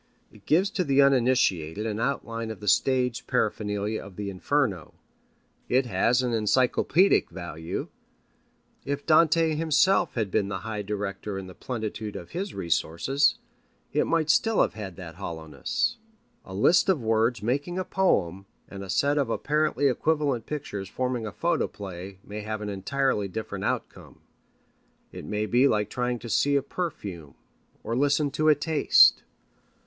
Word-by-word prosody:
It 100 -2 -20
gives 185 +6 +3
to 185 - 0
the 140 -3 +1
uninitiated 115 - +2
an 110 -1 -2
outline 115 -3 -2
of 110 - -7
the 105 - -9
stage 125 +3 +1
paraphernalia 105 -3 -1
of 100 -2 -12
the 100 0 -4
Inferno. 100 - -1 0.7
It 130 +1 +3
has 120 +4 +2
an 125 - -1
encyclopædic 130 - +3
value. 85 -2 -6 1.0
If 140 +1 -4
Dante 160 0 +4
himself 165 +3 +2
had 110 -5 -1
been 100 - +1
the 100 -1 -4
high 110 -2 -4
director 100 0 -4
in 95 - -6
the 90 - -10
plenitude 110 -3 -5
of 85 - -8
his 190 +3 -4
resources, 85 - +1 0.6
it - - +1
might 160 -2 +2
still 225 -1 +2
have - - -2
had 100 -5 -7
that 85 -2 -10
hollowness. 100 - -3 0.5
A 95 - -10
list 165 - +4
of 165 -10 +2
words 115 +1 +1
making 145 +9 -1
a 185 - -2
poem 100 - 0 0.2
and 100 0 -8
a 95 - -9
set 145 +9 +2
of 135 -5 0
apparently 150 +4 0
equivalent 140 -3 0
pictures 105 -10 -5
forming 125 -2 -2
a - - -5
photoplay 95 - -3
may 105 +1 -7
have 110 0 -4
an 105 - -4
entirely 105 +2 -1
different 110 +3 -5
outcome. - - -4 0.9
It - - -9
may 105 0 -2
be 125 +5 +4
like 105 -5 0
trying 125 0 -1
to 120 - -9
see 140 +6 +2
a 140 - +2
perfume 100 - -6 0.5
or 115 - -2
listen 145 +2 +2
to 155 +2 +2
a 150 - +6
taste. 150 +1 +5
115 Hz, 155 wpm, -26 LUFS, 100-145 Hz, 1.0 s, a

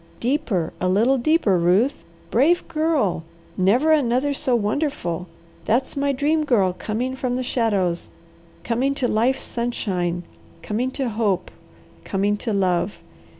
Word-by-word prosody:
Deeper, 240 - -1
a 185 - +1
little 235 +8 +3
deeper, 240 - +2
Ruth! 190 +11 +2 0.3
Brave 300 +10 +3
Girl, 305 - 0 0.3
never 235 +12 +3
another 285 -1 +2
so 260 -2 0
wonderful! 205 - -1 0.4
That's 245 +4 +1
my 280 0 +1
Dream 300 +3 +1
Girl 205 -10 +2
coming 240 +7 -3
from 255 -2 -2
the 255 - -1
shadows, 200 -9 0 0.5
coming 260 +4 0
to 255 - 0
life's 245 +5 +1
sunshine, 185 -7 -2 0.4
coming 235 +5 -1
to 260 -1 -2
hope, 210 -4 -1 0.5
coming 200 - 0
to 225 +2 -3
love! 190 -1 0
235 Hz, 130 wpm, -22 LUFS, 195-270 Hz, 0.5 s, little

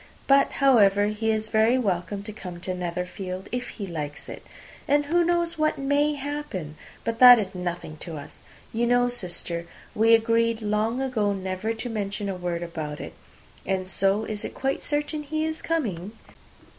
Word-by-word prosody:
But, 275 0 +4
however, 205 -7 +4
he 215 +1 -1
is 220 0 -1
very 220 +3 +4
welcome 200 -3 -1
to 215 +1 -8
come 180 -4 -8
to 185 - -3
Netherfield, 180 +1 -4
if 245 0 -3
he 205 - -6
likes 150 -5 -6
it. - - -8 0.4
And 290 +1 +3
who 345 +4 +3
knows 340 -1 0
what 310 0 +2
may 285 +2 +1
happen? 280 - -5 0.3
But 230 0 -2
that 250 -1 +11
is 200 -3 -2
nothing 175 -3 -5
to 165 0 -7
us. 145 - -10 0.3
You 235 +1 +1
know, 245 0 +3
sister, 175 -6 -4 0.3
we 225 +1 +6
agreed 230 0 +2
long 215 +5 0
ago 215 -6 0
never 190 +2 -3
to 225 +2 -5
mention 205 -2 -3
a 195 - -2
word 175 -1 -3
about 155 -3 -5
it. - - -7 0.5
And 190 -1 -1
so, 195 +3 +2
it - - -5
is 210 -1 -4
quite 270 +1 -1
certain 295 +1 -1
he 310 +2 -2
is 315 0 -3
coming?" 215 - -2
215 Hz, 175 wpm, -25 LUFS, 185-260 Hz, 0.5 s, that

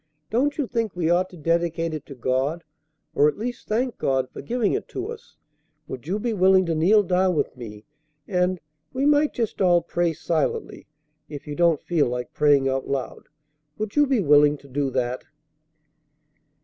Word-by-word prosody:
Don't 275 +6 +1
you 290 - 0
think 230 -5 -2
we 170 -2 0
ought 180 +2 +2
to 180 - -13
dedicate 165 0 0
it 155 -2 -6
to 140 - -9
God, 130 +7 -1 0.5
or 145 - +4
at 150 - -1
least 240 +3 -5
thank 240 +3 -1
God 130 -1 0
for - - -8
giving 235 -2 0
it 410 - -3
to 385 +4 -5
us? 455 -1 -12 0.5
Would 130 +2 -8
you 190 +4 -1
be 230 +2 -2
willing 190 -1 +4
to 165 - -1
kneel 190 +7 +4
down 185 0 +1
with - - -1
me, 110 -4 -10 0.4
and 180 -1 0 0.3
we 265 +2 0
might 295 0 +4
just 230 -4 -3
all 175 -2 +4
pray 175 -1 0
silently, 160 -1 -2 0.4
if 145 -2 -8
you 150 - -6
don't 170 -3 +2
feel 165 -6 +1
like 125 0 -4
praying 145 -2 +3
out 135 0 -1
loud. 135 -2 -4 0.5
Would 215 -1 -4
you 295 -1 +4
be 265 -3 +2
willing 150 -2 +5
to 140 - -17
do 140 +1 -1
that?" 125 -1 -2
170 Hz, 185 wpm, -24 LUFS, 145-215 Hz, 0.5 s, willing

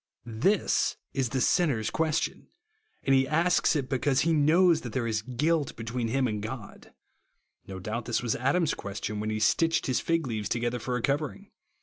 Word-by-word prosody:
This 130 - +1 0.2
is 135 -3 0
the 130 - -1
sinner's 135 - +1
question; 160 0 -1 0.6
and 135 - +2
he 135 0 +4
asks 165 +3 +2
it 140 -4 -1
because 130 0 +1
he 165 +2 +2
knows 160 +3 +4
that 120 - -7
there 130 -3 -1
is 110 -2 -1
guilt 145 +6 0
be 115 - -7
tween 115 +1 -2
him 130 +2 +1
and 105 -2 -3
God. 110 -1 -8 0.8
No 95 - -7
doubt 110 +5 -4
this 120 0 -1
was 120 - 0
Adam's 140 +6 +1
question 105 +1 -5
when 105 +1 -2
he 110 0 -2
stitched 165 +9 +2
his 130 - +1
fig 165 -2 0
leaves 110 -5 -3
together 120 +1 -1
for 125 +2 -3
a 115 - -5
covering. 150 +8 -2
130 Hz, 190 wpm, -28 LUFS, 115-155 Hz, 0.8 s, he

